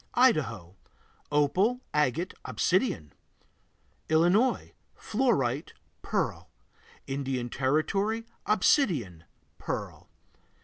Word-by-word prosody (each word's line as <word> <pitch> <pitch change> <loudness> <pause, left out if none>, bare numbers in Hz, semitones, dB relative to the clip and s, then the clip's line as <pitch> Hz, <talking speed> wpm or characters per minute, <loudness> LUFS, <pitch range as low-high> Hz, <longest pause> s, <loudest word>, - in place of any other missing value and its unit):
Idaho 115 - +2 0.6
Opal, 185 - +2
agate, 150 +5 +1
obsidian. 180 - 0 1.0
Illinois 175 +11 +3 0.2
Fluorite, 180 - 0 0.3
pearl. - - -2 0.6
Indian 135 -3 -3
Territory 195 - 0 0.2
Obsidian, 165 - +2 0.3
pearl. - - -5
155 Hz, 60 wpm, -28 LUFS, 130-215 Hz, 1.0 s, Illinois